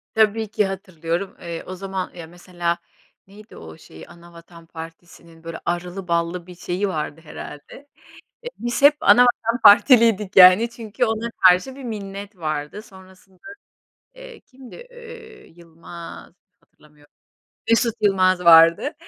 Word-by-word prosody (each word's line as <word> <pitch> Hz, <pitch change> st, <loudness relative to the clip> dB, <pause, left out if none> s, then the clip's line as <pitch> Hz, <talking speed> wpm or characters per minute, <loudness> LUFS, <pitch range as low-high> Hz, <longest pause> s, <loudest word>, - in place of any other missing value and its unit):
Tabii 220 Hz, 0 st, +1 dB
ki, 210 Hz, 0 st, -1 dB
hatırlıyorum. 185 Hz, -2 st, -5 dB
Eee, 170 Hz, -1 st, -7 dB
o 185 Hz, -, -8 dB
zaman 190 Hz, 0 st, -6 dB
ya 170 Hz, -2 st, -10 dB
mesela 175 Hz, 0 st, -4 dB, 0.5 s
neydi 210 Hz, +3 st, -16 dB
o 80 Hz, -1 st, -12 dB
şeyi? 80 Hz, 0 st, -15 dB
Anavatan 170 Hz, 0 st, -17 dB
Partisinin, 165 Hz, 0 st, -13 dB
böyle, 165 Hz, 0 st, -8 dB
arılı 175 Hz, +2 st, -5 dB
ballı 170 Hz, +1 st, -2 dB
bir 180 Hz, -, -12 dB
şeyi 180 Hz, +3 st, -4 dB
vardı, 155 Hz, -3 st, -5 dB
herhâlde. 150 Hz, -, -12 dB, 0.6 s
Eee, 485 Hz, -, -7 dB
biz 240 Hz, +3 st, -4 dB
hep 290 Hz, +1 st, +6 dB
Anavatan 245 Hz, -1 st, +3 dB
Partiliydik, 215 Hz, -3 st, +5 dB
yani, 185 Hz, +5 st, +7 dB
çünkü 230 Hz, 0 st, -4 dB
ona 225 Hz, 0 st, -3 dB
karşı 185 Hz, +7 st, +2 dB
bir 275 Hz, -, -11 dB
minnet 200 Hz, -2 st, -8 dB
vardı. 155 Hz, +4 st, -5 dB
Sonrasında, 190 Hz, -2 st, -19 dB, 0.7 s
eee, -, -, -13 dB
kimdi, 255 Hz, -1 st, -17 dB, 0.2 s
eee, 470 Hz, -2 st, -14 dB
Yılmaz 170 Hz, 0 st, -13 dB, 0.3 s
hatırlamıyorum. 150 Hz, -1 st, -26 dB, 0.6 s
Mesut 230 Hz, 0 st, +1 dB
Yılmaz 185 Hz, -3 st, +1 dB
vardı. 165 Hz, -, +5 dB
185 Hz, 130 wpm, -21 LUFS, 170-225 Hz, 0.7 s, yani